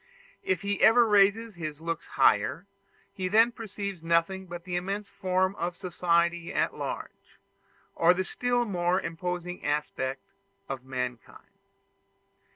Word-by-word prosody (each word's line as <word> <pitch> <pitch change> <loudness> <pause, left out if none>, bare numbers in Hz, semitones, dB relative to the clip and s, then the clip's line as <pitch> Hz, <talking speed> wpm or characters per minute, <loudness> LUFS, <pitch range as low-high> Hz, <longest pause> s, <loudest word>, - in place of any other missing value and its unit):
If 185 -3 0
he 200 -1 -1
ever 235 +2 +7
raises 210 +2 +4
his 155 -4 -6
looks 165 0 -4
higher, 135 - +2 0.5
he 185 -1 -3
then 225 +5 +5
perceives 200 -5 -6
nothing 170 +3 +1
but 175 0 -7
the 180 0 -4
immense 195 +3 -2
form 190 -1 0
of 175 +1 -3
society 170 -1 0
at - - 0
large, - - -7 0.6
or 170 +1 +5
the 185 - 0
still 245 +2 0
more 180 -3 +1
imposing 180 +1 -4
aspect 135 -2 -2 0.4
of 135 -2 -5
mankind. 125 -2 -6
180 Hz, 130 wpm, -28 LUFS, 165-200 Hz, 0.6 s, ever